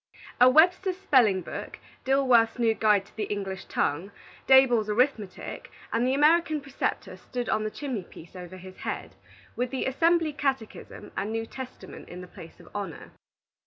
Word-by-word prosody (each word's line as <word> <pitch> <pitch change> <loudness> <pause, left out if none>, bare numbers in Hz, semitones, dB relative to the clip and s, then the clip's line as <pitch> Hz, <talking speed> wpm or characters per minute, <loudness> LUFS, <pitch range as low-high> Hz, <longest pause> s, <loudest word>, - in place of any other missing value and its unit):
A 250 +1 +8
"Webster's 360 +6 +4
Spelling 240 - +3
book," - - -7 0.3
"Dilworth's 255 -4 +3
New 230 -2 +2
Guide 210 -3 +2
to - - -22
the 215 - -2
English 195 -2 -5
Tongue," 165 +8 -1 0.4
"Daboll's 245 -5 +5
Arithmetic," 215 -3 -1 0.2
and 235 +2 +1
the 260 - +2
"American 310 +1 +3
Preceptor," 275 -2 -4
stood 245 -1 -6
on 215 - 0
the 215 - -2
chimney 255 -3 -4
piece 175 0 -14
over 180 0 -9
his 185 0 -12
head, - - -5 0.4
with 250 0 -1
the 265 - -3
"Assembly 325 +3 +2
Catechism," 270 -6 -4
and 205 +2 -2
New 225 0 -2
Testament, 260 +2 -10
in 180 +1 -8
the 180 - -10
place 165 -2 -13
of - - -16
honor. 200 -6 -6
240 Hz, 160 wpm, -27 LUFS, 205-275 Hz, 0.4 s, A